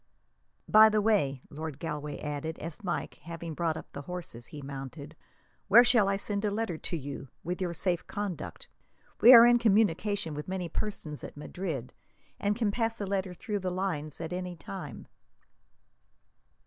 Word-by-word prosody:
"By 215 +1 +8
the 215 0 +2
way," 195 - +2
Lord 155 -1 -5
Galway 150 -2 -4
added 150 +2 -4
as, 165 +5 -8
Mike 175 -2 -3
having 170 0 -6
brought 160 0 -1
up - - -10
the 140 - -6
horses, 155 -7 -7
he 145 -1 -9
mounted; 140 +2 -7 0.5
"where 225 +5 +9
shall 235 -5 +4
I 195 - +2
send 200 +1 -2
a 210 - +2
letter 205 -4 -2
to 170 - -3
you, 140 -1 -6 0.2
with 180 +3 -3
your 180 -2 0
safe 175 +1 -1
conduct? 205 -5 -5 0.5
We 240 - +10
are 235 -2 +11
in 240 0 +6
communication 205 -4 +2
with 150 0 -6
many 185 -2 -3
persons 165 -9 -4
at - - -8
Madrid, 150 -5 -5 0.5
and 205 +1 +1
can 220 -2 +1
pass 225 +1 -1
a 205 - -2
letter 190 -2 -2
through 210 0 -3
the 185 -1 -2
lines 180 -6 -3
at 165 +1 -4
any 180 0 -4
time." 145 -11 -8
180 Hz, 170 wpm, -30 LUFS, 150-205 Hz, 0.5 s, are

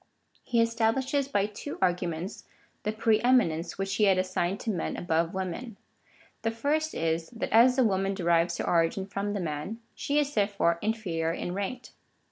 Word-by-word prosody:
He 235 -1 +2
establishes 240 +5 +1
by 205 -7 +1
two 215 +8 -7
arguments 180 0 -1 0.4
the 215 - -1
pre 220 0 +2
eminence, 210 -10 +2
which 195 0 -2
he 215 - +4
had 190 -2 +4
assigned 185 0 -1
to 225 - -1
men 175 -5 -3
above 165 -1 0
women. 190 +4 -5 0.6
The 225 - 0
first 295 +7 -1
is, 165 0 -1
that 230 - -5
as 245 +3 +6
the 260 - +4
woman 195 -2 +1
derives 170 -2 +2
her - - -2
origin 170 +3 +2
from 200 +1 -3
the 205 - -2
man, 165 +6 -4
she 285 - -1
is 290 -1 +1
therefore 200 -5 +1
inferior 185 -7 -1
in 175 - -4
rank. 200 +6 -4
200 Hz, 170 wpm, -28 LUFS, 175-230 Hz, 0.6 s, as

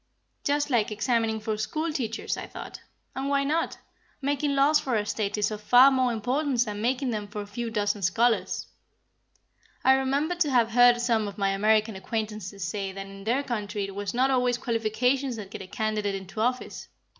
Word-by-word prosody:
Just 290 0 0
like 230 -4 +2
examining 220 +1 0
for 215 0 -2
school 310 +8 -2
teachers, 225 -5 -2
I - - -6
thought. - - -9 0.3
And 270 +1 -2
why 280 0 +2
not? 315 +4 -1 0.4
Making 285 +1 0
laws 285 +2 +4
for 255 -3 -1
a 210 -1 0
State 210 -1 -2
is 210 +1 +1
of 210 -1 -5
far 250 +5 +7
more 255 -2 +2
importance 250 +3 0
than 210 -3 -5
making 255 +2 0
them 210 -2 -3
for 210 +1 -7
a - - -7
few 230 +3 -4
dozen 205 -2 -1
scholars. 225 +6 +1 1.2
I 265 - +6
remembered 280 +6 0
to 310 -4 +3
have 235 -4 +3
heard 245 +1 +6
some 230 -3 +1
of 200 - -8
my 195 -1 +1
American 215 +2 +2
acquaintances 210 -1 -4
say 195 +3 -3
that 195 0 -7
in 195 0 -11
their 250 +5 +1
country 210 -5 -3
it 195 0 -5
was 200 0 -3
not 260 +4 +2
always 250 -2 +2
qualifications 245 +3 0
that 205 -3 -8
get 210 - -7
a 190 - -8
candidate 215 -1 -1
into 195 +2 -6
office. 250 +2 -2
225 Hz, 190 wpm, -27 LUFS, 210-260 Hz, 1.2 s, far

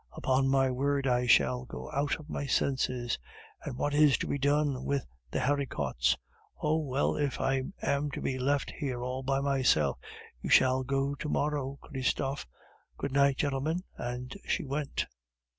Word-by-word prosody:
Upon 135 +1 +1
my 135 -1 +3
word, 140 +2 0
I 125 -1 +2
shall 65 - +4
go 65 +1 -8
out 145 +1 +1
of 155 - -12
my 140 - -3
senses! 130 -3 0 0.4
And 125 - -5
what 145 +2 0
is 150 -2 +5
to - - -3
be 140 - -1
done 140 -1 +2
with 140 -2 -1 0.2
the - - -2
haricots! 125 - +1 0.4
Oh, 155 +1 +2
well, 140 -2 0
if 145 -3 -1
I 135 -1 +1 0.2
am 140 +1 +1
to - - -3
be 130 -1 -2
left 140 +2 +1
here 125 -4 -3
all 125 +1 -3
by 135 +1 0
myself, 135 - +2 0.4
you - - -4
shall 130 0 +5
go 135 +1 0
to 150 +2 -5
morrow, 145 -2 -1
Christophe. 135 - -2 0.5
Good 140 - -3
night, 140 0 +4
gentlemen," 150 +5 0
and 125 +1 -5
she - - -1
went. 140 +1 -2
135 Hz, 165 wpm, -30 LUFS, 130-145 Hz, 0.5 s, is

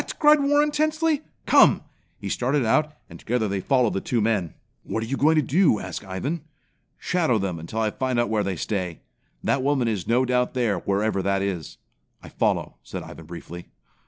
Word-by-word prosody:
cried 300 0 +6
Warren 290 +1 +3
tensely. 310 0 +1 0.2
"Come!" - - +5 0.3
He - - -7
started 130 +1 0
out, 150 +7 +2 0.2
and - - -12
together 115 -1 -1
they 100 -1 -2
followed 125 +3 +2
the 95 - -2
two 120 - -1
men. 105 -6 0 0.3
"What 110 - -3
are - - -3
you 130 +4 -2
going 155 +4 +3
to 155 - +3
do?" 150 - +3
asked - - -6
Ivan. 115 - -3 0.6
"Shadow 160 -10 +1
them 95 -4 -2
until 95 +8 -4
I 110 -1 +1
find 130 +1 -2
where 105 -1 0
they 95 -1 -2
stay. 90 -2 -3 0.4
That 135 - +1
woman 135 -3 +1
is 105 -6 -2
no 125 +3 +3
doubt 125 0 0
there, 115 -7 +1
wherever 100 0 0
that 100 +1 0
is." 90 -7 -4 0.5
"I - - -10
follow," - - -1
said - - -7
Ivan - - -11
briefly. 85 +1 -9
115 Hz, 190 wpm, -24 LUFS, 100-145 Hz, 0.6 s, cried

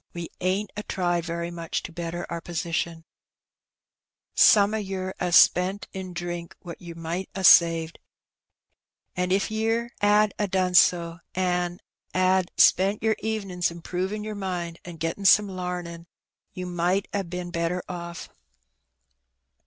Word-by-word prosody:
we 170 -1 -5
ain't 190 +3 -1
a 210 - -3
tried 175 -4 -1
very 170 0 -4
much 170 -1 -4
to - - -7
better 170 +1 -5
our 170 0 -5
positioiL 165 -1 -3 1.3
Some 205 0 +6
o' - - 0
yer 190 -2 -4
'as 175 -2 +1
spent 185 +4 +4
in 190 -1 -6
drink 175 -1 -5
what 170 -3 -9
yer 170 -1 -9
might 170 +3 -4
a 195 - -3
saved^ 165 -2 +5 1.2
an' 180 0 -1
if 195 +3 +1
yer 225 +2 0
'ad 210 0 +4
a 205 - +1
done 185 -1 0
so, 170 -1 +4 0.2
an' 180 -1 -1 0.3
'ad 185 0 +2
spent 195 +4 +4
yer 220 -1 +2
evenin's 195 -5 -2
improvin' 180 +5 -4
yer 215 0 -5
mind 180 -4 -4
an' 175 -1 -9
gettin' 165 +5 -3
some 205 +2 +6
lamin', 180 -2 -5 0.4
ye 185 -2 -6
might 180 +2 0
ha' 200 - 0
been 180 -1 -6
better 170 +1 -2
oflf. 170 -1 -7
180 Hz, 145 wpm, -25 LUFS, 170-195 Hz, 1.3 s, Some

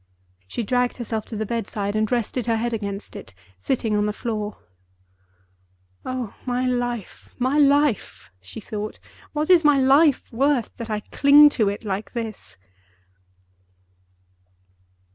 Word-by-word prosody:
She 230 - -4
dragged 245 +3 0
herself 225 -3 -4
to 225 - -7
the 220 +1 -2
bedside, 210 -2 -3
and 215 0 0
rested 245 0 -1
her 230 - +2
head 235 +1 -2
against 200 -2 -5
it, 200 - -10 0.2
sitting 220 - -1
on 210 0 +1
the - - 0
floor. 215 -2 -4 1.5
"Oh, 255 -5 -4
my 250 0 -1
life! 245 -4 -3
my 260 +4 +1
life!" 285 -4 +2
she 95 - -10
thought; 210 0 -6 0.4
"what 305 +3 0
is 345 -2 +6
my 295 -2 +5
life 275 +2 +4
worth, 265 0 0
that 230 -1 -7
I 210 -1 -2
cling 290 +5 +6
to 220 -8 +1
it 200 - -5
like 205 0 -4
this?" 225 - -6
235 Hz, 140 wpm, -23 LUFS, 210-260 Hz, 1.5 s, is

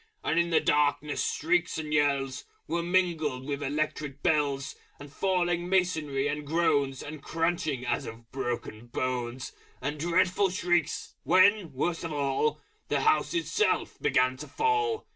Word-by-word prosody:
And 165 - +2
in 170 0 +2
the 165 - +4
darkness 145 0 +1
shrieks 175 +2 +1
and 155 -1 -4
yells 140 -3 +1 0.2
Were 170 +2 -1
mingled 170 -7 0
with 140 0 -3
Electric 150 0 -3
Bells, 145 -5 +1 0.2
And 145 0 -11
falling 175 -2 0
masonry 155 -7 +1
and 150 +1 -2
groans, 145 -4 +1
And 150 0 -8
crunching, 165 -6 -1
as 120 -1 -1
of 115 +1 -11
broken 120 -3 -4
bones, 125 0 -3 0.3
And 145 +3 -3
dreadful 180 +4 +2
shrieks, 175 -3 0
when, 185 0 +4
worst 165 +6 -1
of 165 - -4
all, 145 +1 0 0.3
The 145 -1 0
House 150 +4 +2
itself 165 -2 0
began 130 0 +2
to - - -8
fall! 445 0 0
150 Hz, 145 wpm, -28 LUFS, 135-175 Hz, 0.3 s, the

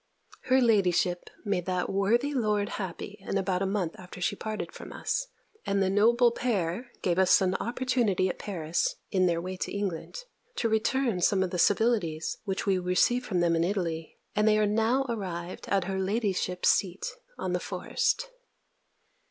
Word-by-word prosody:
Her 260 +1 +4
ladyship 185 -6 +2 0.2
made 190 -4 -1
that 180 -1 0
worthy 235 +9 +1
lord 210 -5 +1
happy 195 +3 -6
in 200 0 -2
about 190 -1 0
a 195 - +1
month 190 -4 -1
after 180 0 -10
she 180 - 0
parted 215 +1 -4
from - - -10
us, - - -2 0.4
and 200 0 0
the 190 -1 +2
noble 235 +4 +4
pair 230 -2 -1
gave 175 0 +1
us 190 -1 +6
an 185 -2 +1
opportunity 235 -6 +1
at 180 - -4
Paris, 180 - -1 0.2
in 185 -2 +3
their 170 -1 +1
way 185 +2 -5
to - - -3
England, 195 -5 -3 0.4
to 230 - 0
return 220 -1 +1
some 190 +2 +3
of 185 - -3
the 180 - -2
civilities 200 -6 +1
which 195 -2 -2
we 195 -2 +2
received 185 +8 +2
from 180 -4 0
them 170 -1 +3
in 165 - +2
Italy; 170 -4 -2 0.2
and 210 +1 +3
they 215 0 +5
are 215 - +3
now 225 +6 +2
arrived 185 -6 -4
at 195 -2 +2
her 190 +1 -2
ladyship's 190 -2 0
seat 185 -1 +1 0.3
on - - -2
the - - +1
Forest. - - -1
195 Hz, 175 wpm, -28 LUFS, 180-220 Hz, 0.4 s, us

